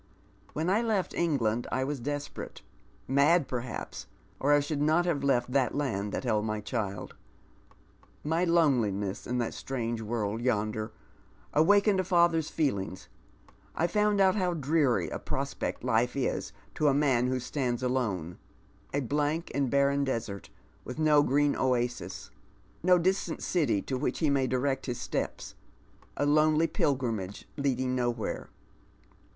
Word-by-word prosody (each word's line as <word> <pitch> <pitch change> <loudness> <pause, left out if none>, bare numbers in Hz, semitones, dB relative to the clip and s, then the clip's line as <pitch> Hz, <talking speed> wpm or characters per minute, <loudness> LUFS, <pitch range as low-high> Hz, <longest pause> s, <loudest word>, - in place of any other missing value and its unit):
When 155 +3 -2
I 200 +5 +3
left 215 -5 0
England 120 -9 0
I 130 - 0
was 140 +1 -3
desperate 145 +3 -5 0.2
— - - -32
uiiid, 140 +4 +4
perhaps, 120 -2 -5 0.3
or 145 - +2
I 145 - +6
should 145 0 -2
not 160 +4 +3
have 155 -6 0
left 125 -3 +1
the 135 -1 +2
land 105 -8 -2
that - - -3
held 110 -4 +1
my 110 -1 -2
cliild. 105 -3 -4 1.1
My 160 +3 +1
loneliness 120 - +1
in 125 - -1
that 120 -2 -1
strange 120 -3 -3
world 110 0 -2
yonder 110 -2 -1 0.6
awakened 200 +5 +4
a - - +2
father's 170 -3 +3
feelings, 100 - -2 0.7
I 165 - +1
found 210 +3 +2
out 190 -1 +5
how 180 -4 0
dreary 140 - +2
a - - -4
prospect - - -3
life 120 0 +1
is 135 -2 -1 0.2
to 150 - +1
a 140 - +4
man 130 -4 +3
who 130 0 0
stands 125 -1 -2
alone 100 -10 -1 0.3
— 95 0 -32
a 145 - +1
blank 150 +5 -1
and 140 -2 0
barren 140 +1 +2
desert, 115 -8 -3 0.3
with 125 - -7
no 155 -2 +5
green 145 +1 +2
oasis 125 -2 -1 0.3
— - - -32
no 180 +1 +5
distiint 185 +3 0
city 130 - +1
to 130 -1 -3
which 145 - -1
he 155 -4 +2
may 135 -2 +2
direct 130 +2 -1
his 120 -2 -3
steps - - -4 0.3
— - - -30
a 145 - +1
lonely 155 +2 +4
pilgrimage 115 - -1
leading 130 -3 0
nowhere." 120 -3 -2
135 Hz, 155 wpm, -29 LUFS, 120-155 Hz, 1.1 s, I